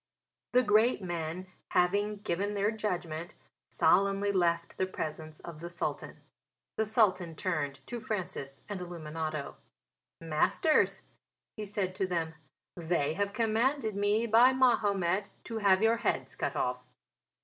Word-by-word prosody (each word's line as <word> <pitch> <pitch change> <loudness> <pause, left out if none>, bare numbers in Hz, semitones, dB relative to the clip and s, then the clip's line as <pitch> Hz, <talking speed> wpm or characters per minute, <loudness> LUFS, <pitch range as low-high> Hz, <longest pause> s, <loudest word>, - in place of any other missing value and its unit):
The 250 +1 +5
great 215 0 +3
men, 170 0 -3 0.3
having 200 +3 +2
given 200 +2 -1
their 205 +2 +2
judgment, 175 -6 -3 0.3
solemnly 200 +1 +3
left 170 -3 0
the 185 - +1
presence 155 -3 -5
of 170 -3 -9
the 170 +2 -6
Sultan. 175 +1 -4 0.5
The 220 - 0
Sultan 185 -6 +2
turned 145 -7 -2
to 240 - -5
Francis 180 -11 -4
and 205 -2 -4
Illuminato. 155 -3 -5 0.6
"Masters," 165 - +2 0.5
he 215 -2 -5
said 195 -2 -2
to 190 0 -1
them, 165 -3 -1 0.4
"they 160 -3 0
have 200 +3 -1
commanded 225 +2 +1
me 205 +3 +2
by 235 +3 +6
Mahomet 200 -7 +2
to 225 -1 -4
have 195 -1 +4
your 225 +1 +4
heads - - -1
cut - - -2
off. - - 0
190 Hz, 130 wpm, -31 LUFS, 170-215 Hz, 0.6 s, by